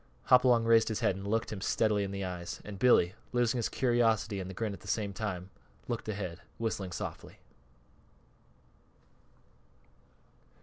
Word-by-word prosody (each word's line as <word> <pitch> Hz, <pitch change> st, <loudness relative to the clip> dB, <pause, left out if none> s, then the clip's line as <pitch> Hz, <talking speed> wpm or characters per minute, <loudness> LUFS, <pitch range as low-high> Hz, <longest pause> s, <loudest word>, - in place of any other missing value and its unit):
Hopalong 125 Hz, -2 st, +6 dB
raised 115 Hz, -1 st, +5 dB
his 110 Hz, -3 st, -2 dB
head 95 Hz, -, +2 dB
and 95 Hz, +1 st, -7 dB
looked 110 Hz, +1 st, 0 dB
him 95 Hz, -, -6 dB
steadily 105 Hz, 0 st, +1 dB
in 100 Hz, -, -3 dB
the 100 Hz, 0 st, -3 dB
eyes; 90 Hz, -1 st, -5 dB
and 100 Hz, -2 st, -8 dB
Billy, 95 Hz, -7 st, +5 dB, 0.2 s
losing 120 Hz, 0 st, +2 dB
his 115 Hz, -, 0 dB
curiosity 115 Hz, -5 st, +1 dB
and 95 Hz, 0 st, -5 dB
the -, -, -6 dB
grin 110 Hz, +1 st, -2 dB
at 100 Hz, -, -9 dB
the -, -, -15 dB
same 105 Hz, -3 st, -1 dB
instant, 95 Hz, -2 st, -4 dB, 0.4 s
looked 120 Hz, -2 st, -3 dB
ahead, 95 Hz, -5 st, -4 dB, 0.2 s
whistling 100 Hz, -5 st, -2 dB
softly. -, -, -6 dB
105 Hz, 150 wpm, -31 LUFS, 95-115 Hz, 0.4 s, Hopalong